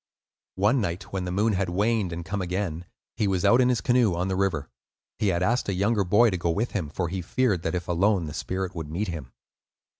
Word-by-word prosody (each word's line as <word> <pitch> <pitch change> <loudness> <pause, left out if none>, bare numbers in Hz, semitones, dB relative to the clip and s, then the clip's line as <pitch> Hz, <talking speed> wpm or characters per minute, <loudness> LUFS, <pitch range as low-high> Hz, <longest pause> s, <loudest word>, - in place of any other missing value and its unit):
One 105 +7 +3
night 90 -1 -4
when 95 -2 -2
the 90 - -3
moon 105 +4 +2
had 95 -1 0
waned 105 +1 +1
and 85 0 -5
come 100 +4 -3
again, 90 -2 -3 0.3
he 110 -3 +1
was 95 -2 0
out 120 +2 +6
in 125 - +4
his 120 -4 +1
canoe 120 -7 +3
on 90 +2 -1
the 95 - 0
river. 95 -7 0 0.5
He 105 - +1
had 90 -1 +1
asked 120 +3 +1
a 100 - 0
younger 100 +2 +2
boy 105 +5 +4
to 90 - -1
go 85 - -1
with 105 +9 0
him, 90 -8 -3
for 85 +4 -2
he 95 +2 -3
feared 105 -1 0
that, 80 +2 -2
if 90 0 -4
alone, 95 +1 +2
the 75 - -6
spirit 95 +3 -3
would 80 -4 -6
meet 95 +6 -2
him. 75 -8 -6
95 Hz, 240 wpm, -26 LUFS, 85-105 Hz, 0.5 s, out